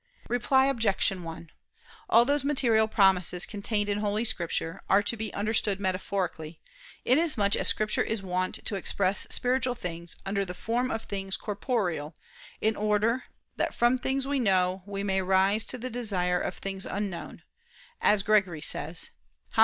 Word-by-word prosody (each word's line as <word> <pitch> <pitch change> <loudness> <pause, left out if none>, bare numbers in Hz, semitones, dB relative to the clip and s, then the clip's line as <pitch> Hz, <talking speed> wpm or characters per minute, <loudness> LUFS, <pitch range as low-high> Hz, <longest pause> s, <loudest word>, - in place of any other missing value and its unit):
Reply 265 +2 +2
Obj. 230 -7 +3
1: 165 -3 -8 0.6
All 235 +1 +6
those 285 +1 +1
material 240 -6 +2
promises 190 -4 +4
contained 205 0 -2
in 205 0 -1
Holy 210 +2 -1
Scripture, 170 -2 +2
are 200 +1 +4
to 220 - -2
be 220 -1 -5
understood 210 -1 0
metaphorically, 185 -4 -3 0.5
inasmuch 255 -8 +3
as - - 0
Scripture 215 0 +1
is 220 -3 -2
wont 185 0 -2
to - - -2
express 195 0 +2
spiritual 250 0 +1
things 170 -6 -5
under 200 +1 -1
the 180 -1 -6
form 240 +6 -1
of 225 -3 -3
things 195 -1 -4
corporeal, 195 - -3 0.5
in 220 0 +1
order 215 +4 0 0.3
"that - - -2
from 240 +2 +2
things 265 +1 -1
we 280 0 -1
know, 185 -4 +1
we 200 0 -4
may 190 -1 0
rise 190 +3 +2
to 255 - -3
the 250 +1 -6
desire 185 -7 -1
of - - -3
things 195 -1 -3
unknown," 200 -3 -5 0.6
as 210 -1 +3
Gregory 195 -6 +2
says 160 +2 0 0.4
(Hom. - - -4
205 Hz, 155 wpm, -27 LUFS, 185-230 Hz, 0.6 s, All